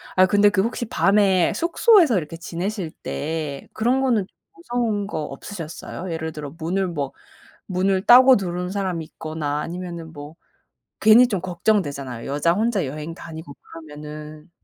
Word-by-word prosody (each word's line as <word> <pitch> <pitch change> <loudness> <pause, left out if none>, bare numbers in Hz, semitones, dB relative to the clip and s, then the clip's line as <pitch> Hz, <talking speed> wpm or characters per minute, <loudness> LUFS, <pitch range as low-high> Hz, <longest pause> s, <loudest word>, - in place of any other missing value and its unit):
아 185 - +6
근데 205 +2 +4
그 205 -2 +1
혹시 235 +3 -2
밤에 195 -4 +3
숙소에서 335 - +4
이렇게 165 0 -4
지내실 180 +1 -4
때 150 -2 -4
그런 245 +4 +1
거는 235 -7 +2
좀 - - -42 0.2
무서운 240 - -2
거 155 -6 -3
없으셨어요? 165 +3 -7
예를 160 -1 -3
들어 150 -2 -7
문을 185 +4 -1
뭐 145 -5 -4 0.5
문을 190 0 +1
따고 255 +1 +8
들어오는 180 -2 -3
사람이 185 -5 -2
있거나 155 -2 -4
아니면은 170 -1 -6
뭐 145 +2 -10 0.7
괜히 235 +3 +7
좀 200 -6 -1
걱정되잖아요, 165 - -1
여자 145 +4 +1
혼자 210 -2 0
여행 150 +4 -6
다니고 160 -2 -9
그러면은. 150 0 -10
175 Hz, 330 characters per minute, -22 LUFS, 155-205 Hz, 0.7 s, 따고